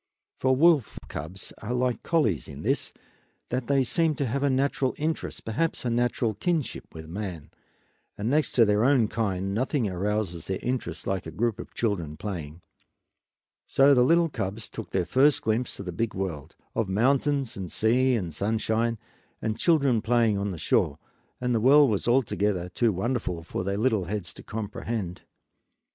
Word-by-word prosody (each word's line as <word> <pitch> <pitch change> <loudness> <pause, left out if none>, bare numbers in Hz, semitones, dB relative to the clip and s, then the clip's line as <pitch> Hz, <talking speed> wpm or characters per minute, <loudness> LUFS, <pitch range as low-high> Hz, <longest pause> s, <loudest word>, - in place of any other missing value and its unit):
For 130 0 +3
wolf 150 -4 +4
cubs 80 +6 -7
are 120 +3 -3
like 125 -1 0
collies 110 - +1
in - - -9
this, - - 0 0.6
that 125 0 -2
they 140 -1 +3
seem 160 +4 +1
to 140 - -1
have 135 +3 -1
a 140 - +2
natural 135 0 +1
interest, 155 +2 -3
perhaps 130 +7 -1
a 120 - +1
natural 120 -1 +1
kinship 155 - -2
with 80 -1 -9
man, 90 -3 -6 0.7
and 105 - -3
next 150 +4 +1
to 115 - +6
their 105 +1 +2
own 130 -4 +4
kind 95 -4 -1
nothing 125 +1 0
arouses 95 -2 -2
their 95 - -1
interest 125 +1 -3
like 95 -3 -2
a - - -6
group 110 +5 -1
of - - -9
children 85 -10 -1
playing. 85 -5 -6 1.0
So 140 +1 +5
the 125 - +5
little 165 +6 +4
cubs 105 -4 -4
took 115 - -7
their 95 -2 0
first 135 - +3
glimpse 110 +3 -1
of 100 - -6
the 90 - -3
big 110 +6 -2
world, 90 -7 -4 0.2
of 110 -4 -1
mountains 135 +5 +1
and 95 -3 -6
sea 125 +3 +3
and 90 -8 -3
sunshine, 110 +4 0 0.4
and 110 -1 -2
children 140 -9 +3
playing 115 -2 +3
on 100 +1 -1
the 90 - -5
shore, 70 -2 +1 0.4
and 125 0 0
the 115 - +1
world 140 +1 +6
was 105 - -1
altogether 105 -7 +1
too 115 +5 +2
wonderful 95 -4 -2
for 85 - -4
little 100 +2 +1
heads 95 -2 -4
to - - -11
comprehend. 105 -3 -4
110 Hz, 170 wpm, -27 LUFS, 95-130 Hz, 1.0 s, to